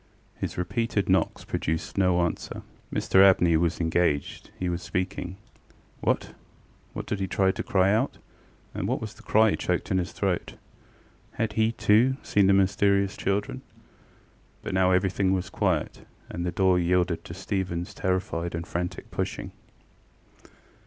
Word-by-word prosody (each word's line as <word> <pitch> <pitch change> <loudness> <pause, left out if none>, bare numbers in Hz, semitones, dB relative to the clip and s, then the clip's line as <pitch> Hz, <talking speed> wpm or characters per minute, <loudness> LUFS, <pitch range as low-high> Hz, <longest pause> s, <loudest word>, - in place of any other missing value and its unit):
His - - -5
repeated 100 +2 -1
knocks 95 - +1
produced 80 +1 -3
no 90 -2 +3
answer. 85 -1 -3 0.3
Mr 95 - +4
Abney 90 -3 +5
was 85 +1 +1
engaged: 80 -3 0
he 90 - -2
was 85 0 -2
speaking. 90 0 -3 0.6
What! - - -1 0.6
why - - -4
did 105 - -3
he 95 - -1
try 95 0 +2
to - - -5
cry 95 0 +2
out? 115 +6 0 0.6
and - - -3
why - - +1
was - - -6
the - - -17
cry 110 0 +4
choked 90 -1 -2
in 95 - +3
his 90 - -3
throat? - - -2 0.8
Had 110 -1 -2
he, 110 +1 +2
too, 120 +5 +3
seen 100 -2 +3
the - - +5
mysterious 100 0 +2
children? 100 +1 -2 1.0
But - - -4
now 95 0 +3
everything 95 +1 +2
was 95 +1 -2
quiet, 95 -7 -1 0.3
and 85 - -4
the 90 - -1
door 95 0 +3
yielded 90 0 +1
to - - -7
StephenŌĆÖs 95 -1 -3
terrified 90 -3 -2
and 85 0 -4
frantic 90 +1 -4
pushing. - - -3
95 Hz, 150 wpm, -26 LUFS, 90-100 Hz, 1.0 s, Abney